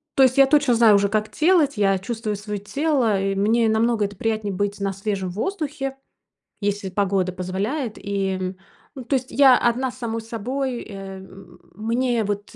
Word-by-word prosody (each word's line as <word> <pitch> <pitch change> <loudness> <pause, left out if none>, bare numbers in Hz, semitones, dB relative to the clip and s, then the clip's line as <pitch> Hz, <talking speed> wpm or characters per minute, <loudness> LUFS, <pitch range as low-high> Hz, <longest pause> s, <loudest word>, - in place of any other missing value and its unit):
То 270 - +6
есть 260 +1 +3
я 275 - +7
точно 280 -3 +3
знаю 225 -2 +6
уже, 200 0 +2
как 215 0 0
делать. 315 -3 +3
Я 195 -2 +2
чувствую 215 0 -4
своё 210 0 -5
тело. 245 -3 0
И 195 0 -1
мне 225 +4 +2
намного 220 -1 +2
это 200 0 -6
приятнее- 215 -1 -2
быть 205 +2 -2
на 195 -1 -1
свежем 195 -1 -3
воздухе, 275 - -3 0.6
если 205 -1 -1
погода 190 -1 0
позволяет, 200 - -3
и 190 -2 -2 0.4
Ну, 260 - -7
то 270 +4 0
есть 260 0 -3
я 265 -2 +6
одна 245 +2 +1
с - - -16
самой 230 -1 -3
собой, 245 +3 -3
э, 195 -1 -8
м 190 0 -14 0.2
мне 230 +2 0
вот 205 +2 -4
215 Hz, 175 wpm, -22 LUFS, 200-255 Hz, 0.6 s, я